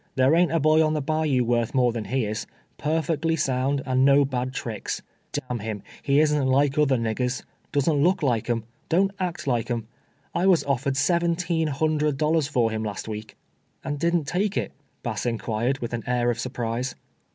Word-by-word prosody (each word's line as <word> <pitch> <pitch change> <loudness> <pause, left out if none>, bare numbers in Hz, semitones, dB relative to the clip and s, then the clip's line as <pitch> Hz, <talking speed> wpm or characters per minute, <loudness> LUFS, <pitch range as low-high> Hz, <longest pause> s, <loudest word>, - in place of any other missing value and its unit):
There 130 +3 +4
ain't 175 +1 +4
a 165 - +2
boy 155 +1 +4
on 155 0 +1
the - - +1
bayou 155 -4 +1
worth 120 0 0
more 125 -2 +4
tlian 115 -3 -4
he 130 -2 0
is 105 +1 -4
— - - -38
perfect 160 0 0
ly 165 0 +2
sound, 135 -1 0
and 130 0 +2
no 140 +1 +6
bad 130 -1 -2
tricks. 115 -5 -4 0.3
D 145 - -2
— - - -31
n 120 - -1
him, 105 -2 -5 0.2
he 140 0 +3
isn't 150 -3 +3
like 140 +1 +3
other 145 -4 +3
niggers; 120 +3 -1 0.3
doesn't 145 +1 +2
look 180 -1 +2
like 120 -4 +1
'em 115 -2 0
— - - -39
don't 195 +4 +3
act 180 -4 -3
like 120 -4 0
'em. 115 -2 -2 0.5
I 185 - +1
was 180 -4 +5
ofiered 135 0 0
seventeen 170 +1 +1
hundred 150 0 0
dollars 155 0 +2
for 120 -6 +1
him 110 0 -2
last 105 -1 -4
week." 110 0 -7 0.2
" - - -43
And 145 0 -3
didn't 170 +1 +2
take 190 +6 0
it - - -1 0.2
?" - - -43
Bass 120 -1 -2
inquired, 115 +2 -1
with 120 0 -4
an 115 - -3
air 120 -1 +2
of 120 - -4
surprise. 125 0 -3
135 Hz, 210 wpm, -25 LUFS, 120-155 Hz, 0.5 s, no